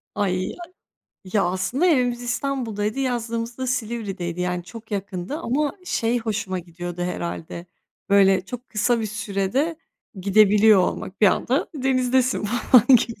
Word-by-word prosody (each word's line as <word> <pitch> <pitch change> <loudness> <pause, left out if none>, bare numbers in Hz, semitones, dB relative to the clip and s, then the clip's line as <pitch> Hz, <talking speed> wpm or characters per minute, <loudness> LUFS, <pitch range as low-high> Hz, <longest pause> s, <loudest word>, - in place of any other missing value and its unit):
Ay, 185 -2 -1
a - - -10 0.7
Ya, 195 +2 0
aslında 185 - 0
evimiz 245 -6 +2
İstanbul'daydı, 240 -3 -2
yazlığımız 235 -2 -2
da 260 - -2
Silivri'deydi. 210 -8 -3
Yani 180 -1 -2
çok 225 +3 -11
yakındı 195 +4 -4
ama 290 0 0
şey 235 -6 0
hoşuma 205 -4 -3
gidiyordu 175 +1 -6
herhâlde, 170 -1 -5 0.4
böyle, 195 -2 +5
çok 245 +5 -8
kısa 230 +2 +1
bir 220 - -2
sürede 210 - -1 0.4
gidebiliyor 210 +1 +5
olmak, 185 +2 -3
bir 210 - +7
anda 250 +8 +1
denizdesin 255 -3 +1
falan 240 +1 +4
gibi. 230 0 -3
215 Hz, 130 wpm, -23 LUFS, 190-245 Hz, 0.7 s, bir